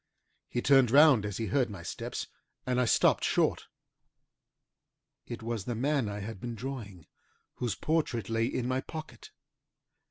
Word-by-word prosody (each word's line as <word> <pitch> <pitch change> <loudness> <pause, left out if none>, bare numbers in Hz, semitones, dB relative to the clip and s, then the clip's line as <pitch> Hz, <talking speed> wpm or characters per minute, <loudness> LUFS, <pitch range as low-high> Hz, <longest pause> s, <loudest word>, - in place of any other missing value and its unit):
He 120 - -2
turned 135 -3 +5
round 135 -5 +6
as 105 - -5
he 115 - -2
heard 125 +5 +1
my 95 -4 -8
steps - - -5 0.4
and 125 0 +1
I - - +2
stopped - - +3
short. - - +1 1.6
It 115 -1 -7
was 115 -4 -3
the 120 - -3
man 135 -1 0
I 105 0 -5
had 105 -1 -7
been 120 -1 -5
drawing, 110 - -7 0.5
whose 120 -6 -2
portrait 150 -8 -1
lay 115 0 0
in 125 -1 -2
my 130 +1 0
pocket. 155 -7 -9
120 Hz, 155 wpm, -30 LUFS, 110-130 Hz, 1.6 s, round